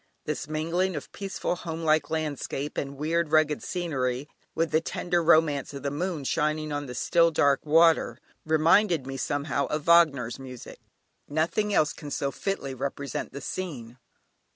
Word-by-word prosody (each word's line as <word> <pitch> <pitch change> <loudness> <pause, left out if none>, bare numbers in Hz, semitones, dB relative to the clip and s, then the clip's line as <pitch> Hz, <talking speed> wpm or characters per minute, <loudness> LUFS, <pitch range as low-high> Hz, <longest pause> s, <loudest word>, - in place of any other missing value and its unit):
This 150 -2 -3
mingling 165 +4 -1
of 150 - -6
peaceful 195 -2 -3
homelike 160 -2 0
landscape, 150 -2 -3
and 140 0 -4
weird 160 +2 0
rugged 155 -2 +3
scenery, 140 -7 -2 0.3
with 165 -1 0
the 155 - +3
tender 175 +1 -1
romance 155 -4 +3
of 140 - -7
the 140 - -1
moon 165 0 -3
shining 155 +2 0
on 145 -1 -3
the 125 - -7
still 170 +5 +3
dark 145 -3 +2
water, 165 +2 +4 0.3
reminded 160 0 +3
me, 135 0 -5
somehow, 140 +1 -1
of 150 0 -2
Wagner's 145 -8 +4
music; 130 -2 -10 0.5
nothing 170 +8 0
else 155 -7 +2
can 150 - -9
so 140 -1 -2
fitly 170 -8 -3
represent 140 +1 -4
the 140 - -7
scene. 130 -10 -6
155 Hz, 155 wpm, -27 LUFS, 140-165 Hz, 0.5 s, water